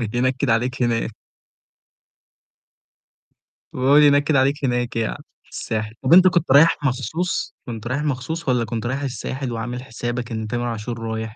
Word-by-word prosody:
ينكد 130 +2 0
عليك 125 +3 0
هناك. 115 -1 0 2.6
وهو 130 +3 +3
اللي 150 0 +7
ينكد 145 +1 +3
عليك 140 +2 +1
هناك 120 -1 -1
يعني 115 +5 -2 0.2
في - - -28
الساحل، 110 -1 -4
طب 130 - +1
أنت 185 +1 +8
كنت 175 -5 0
رايح 150 +4 +6
مخصوص؟ 165 - -2
كنت 115 -1 -7
رايح 135 +4 -1
مخصوص 150 +3 -3
والّا 125 -2 +2
كنت 115 +1 -4
رايح 135 +4 -2
الساحل 130 -1 -4
وعامل 120 +2 -4
حسابك 120 -1 -5
إن 110 -1 -3
تامر 120 +2 -2
عاشور 115 0 -4
رايح؟ 110 0 -4
125 Hz, 155 wpm, -21 LUFS, 115-140 Hz, 2.6 s, أنت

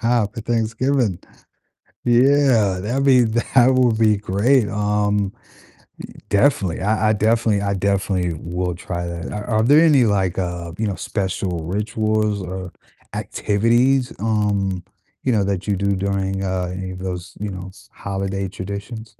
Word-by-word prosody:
For 115 -2 +1
Thanksgiving. 115 -1 0 0.8
Yeah, 120 -6 +3
that'd 125 +7 -1
be 130 -3 +6
that 120 +3 +3
would 125 -3 +3
be 110 -1 +4
great. 105 +5 +2
Um, 105 -1 0 0.7
i - - -15 0.2
definitely. 100 - +2
I 110 +2 +1
I - - +4
definitely 110 -1 +2
I 100 0 0
definitely 95 -2 0
will 90 +1 -3
try 90 0 -5
that. 85 0 -6
Are 105 0 -5
are 110 -2 +1
there 145 +6 +6
any, 145 -6 +5
like, 95 -4 0
uh, 90 -2 -3
you 110 - -1
know, 100 - -2
special 95 -4 -3
rituals 105 +2 -1
or 95 0 -6 0.4
activities, 120 +5 +1
um, 100 -4 0 0.4
you 130 - +1
know, 105 -3 +2
that 100 -1 -2
you 100 - +1
do 100 +1 0
during, 95 0 -2
uh, 95 -1 -2
any 95 0 -5
of 90 - -8
those, 90 -2 -5
you 105 +1 -3
know, 95 -1 -7 0.2
holiday 95 0 -3
traditions? 100 +4 -7
100 Hz, 145 wpm, -21 LUFS, 95-115 Hz, 0.8 s, be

